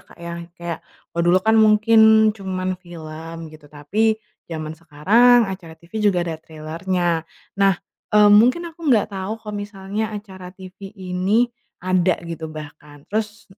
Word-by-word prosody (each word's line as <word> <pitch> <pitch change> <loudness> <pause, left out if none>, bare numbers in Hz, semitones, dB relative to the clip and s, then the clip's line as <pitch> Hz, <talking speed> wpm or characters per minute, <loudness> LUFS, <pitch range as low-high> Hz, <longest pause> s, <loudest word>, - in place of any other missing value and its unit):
Kak, - - -20
ya, 170 0 -8
yang 170 - -10
kayak 170 -1 -5 0.3
kalau 170 - -1
dulu 180 +2 +5
kan, 220 0 +4
mungkin 220 0 +5
cuman 185 -2 -4
film, 165 -2 -9 0.2
gitu. 155 -2 -15
Tapi, 205 +10 0 0.3
zaman 155 -2 -5
sekarang, 195 +11 +4
acara 185 -5 -7
TV 170 +1 -22
juga 190 -5 +2
ada 160 -2 -5
trailernya. 165 +2 -2 0.3
Nah, 195 -1 +5 0.3
eee, 210 -1 +6
mungkin 245 +11 +5
aku 335 - -25
nggak 215 -5 +3
tahu 195 +3 -4
kalau 215 -1 -9
misalnya 205 +1 -4
acara 190 -3 -10
TV 185 +1 -11
ini 190 +5 +1 0.4
ada, 185 -1 +2
gitu, 165 -1 -6
bahkan. 150 -1 -11
Terus, 215 0 -3
185 Hz, 150 wpm, -21 LUFS, 165-210 Hz, 0.4 s, eee